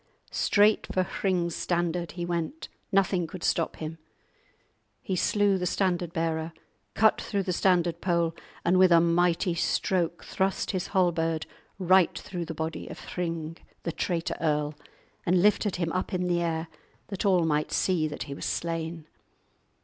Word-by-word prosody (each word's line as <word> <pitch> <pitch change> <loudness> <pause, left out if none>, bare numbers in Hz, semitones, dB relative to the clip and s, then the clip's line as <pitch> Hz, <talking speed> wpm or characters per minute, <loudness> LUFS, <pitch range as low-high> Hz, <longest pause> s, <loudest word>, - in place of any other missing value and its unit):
Straight 210 +1 +3
for 185 - +2
Hring's 180 -2 -1
standard 175 -2 -1
he 175 -1 -4
went, 175 - -3 0.2
nothing 190 -3 +2
could 175 +2 -8
stop 165 - +1
him. 160 +1 -6 1.0
He 190 - -3
slew 200 +1 +2
the 180 - -1
standard 175 -2 0
bearer, 165 -1 -2 0.4
cut 220 0 +4
through 200 -1 -1
the 180 - -1
standard 175 -2 +2
pole, 170 -2 +1 0.3
and 185 +2 +4
with 185 -1 +6
a 170 - +8
mighty 170 +1 +2
stroke 175 0 0
thrust 190 0 -1
his 185 -2 -2
halberd 165 -4 +1 0.3
right 185 -1 +4
through 175 -2 -5
the 165 - -6
body 160 +1 -4
of - - -8
Hring, 165 -2 -4 0.3
the 170 - -2
traitor 165 0 -2
earl, 150 -2 +1 0.5
and 180 +1 +3
lifted 205 +1 +3
him 170 -2 -1
up 185 +2 -2
in 180 0 0
the 175 -1 +1
air 165 -1 -1 0.4
that 195 0 -3
all 185 -4 +4
might 150 -1 0
see 175 -5 +1
that 150 - -5
he 140 - -7
was - - -6
slain. 165 -1 -3
175 Hz, 155 wpm, -28 LUFS, 165-185 Hz, 1.0 s, a